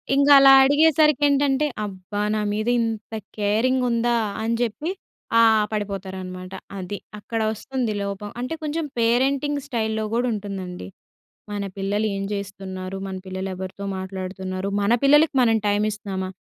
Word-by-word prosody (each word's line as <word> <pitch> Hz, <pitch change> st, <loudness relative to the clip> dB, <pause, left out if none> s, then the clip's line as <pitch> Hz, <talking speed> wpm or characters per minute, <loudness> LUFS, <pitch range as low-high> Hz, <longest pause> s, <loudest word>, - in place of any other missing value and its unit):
ఇంకలా 280 Hz, -1 st, +8 dB
అడిగేసరికేంటంటే, 290 Hz, -1 st, +4 dB, 0.2 s
అబ్బా! 200 Hz, +1 st, -5 dB
నా 215 Hz, -, 0 dB
మీద 215 Hz, +2 st, -2 dB
ఇంత 225 Hz, -1 st, -3 dB, 0.2 s
కేరింగుందా 235 Hz, +3 st, +1 dB, 0.3 s
అనిచెప్పి 230 Hz, -, -1 dB, 0.5 s
ఆ! -, -, +8 dB, 0.3 s
పడిపోతారనమాట. 190 Hz, -3 st, -5 dB, 0.2 s
అది. 190 Hz, +2 st, -5 dB, 0.2 s
అక్కడొస్తుంది 225 Hz, +2 st, -2 dB
లోపం. 200 Hz, +1 st, -5 dB
అంటే, 255 Hz, +6 st, -3 dB
కొంచెం 310 Hz, +1 st, -2 dB
పేరెంటింగ్ 270 Hz, +5 st, +2 dB
స్టైల్‌లో 220 Hz, -3 st, -1 dB
గూడుంటుందండి. 200 Hz, -, -3 dB, 0.6 s
మన 205 Hz, -1 st, -3 dB
పిల్లలు 205 Hz, +2 st, 0 dB
ఏం 195 Hz, -, -3 dB
చేస్తున్నారు? 195 Hz, -1 st, -5 dB
మన 190 Hz, -1 st, -5 dB
పిల్లలు 190 Hz, +1 st, -4 dB
ఎవరితో 190 Hz, +2 st, -7 dB
మాట్లాడుతున్నారు, 190 Hz, 0 st, -5 dB
మన 200 Hz, +3 st, +2 dB
పిల్లలకి 295 Hz, +2 st, +5 dB
మనం 225 Hz, -2 st, +4 dB
టైమిస్తున్నామా, 205 Hz, -2 st, -1 dB
215 Hz, 110 wpm, -23 LUFS, 195-255 Hz, 0.6 s, ఇంకలా